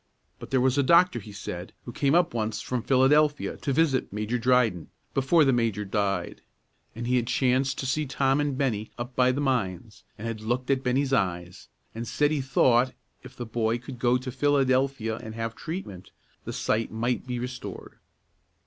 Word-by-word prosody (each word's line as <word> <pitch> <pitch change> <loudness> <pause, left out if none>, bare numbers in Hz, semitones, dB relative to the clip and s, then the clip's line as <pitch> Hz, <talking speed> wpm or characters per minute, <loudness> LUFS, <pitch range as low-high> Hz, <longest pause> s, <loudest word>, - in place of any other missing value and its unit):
But - - -9
there 135 - +2
was 130 +2 +2
a - - +6
doctor, 170 0 +4
he 105 0 -11
said, 95 -2 -7
who 120 - -6
came 140 +5 +1
up 175 0 +3
once 110 -2 -2
from 125 -2 -3
Philadelphia 145 +4 +3
to 140 - -3
visit 140 -2 +1
Major 105 +4 -2
Dryden, 115 -8 +2 0.2
before 145 +4 +4
the 135 - +3
major 115 -4 0
died; 100 -3 -2 0.5
and 120 +1 -5
he 125 +1 +2
had 120 -1 -1
chanced 130 +1 +1
to - - -4
see 150 +3 -1
Tom 135 +1 +1
and 145 -3 -1
Bennie 110 -6 -1
up 120 +1 -6
by 125 0 +4
the 135 +3 -2
mines, 110 -6 -2
and 110 - -7
had 115 -2 -4
looked 120 +4 -1
at 135 -1 +1
Bennie's 135 +2 0
eyes, 90 -5 -1 0.3
and 115 +1 -5
said 145 +6 +1
he 150 -3 0
thought, 130 -1 +3 0.3
if 130 0 -13
the 120 - -5
boy 115 0 0
could 125 +1 -10
go 120 +1 +3
to 130 0 -6
Philadelphia 130 -4 +1
and 110 -2 -8
have 115 0 -3
treatment, 155 - -7 0.4
that - - -5
sight 110 +1 -1
might 120 +3 -2
be 125 -1 -3
restored. 125 0 -7
125 Hz, 190 wpm, -26 LUFS, 110-135 Hz, 0.5 s, a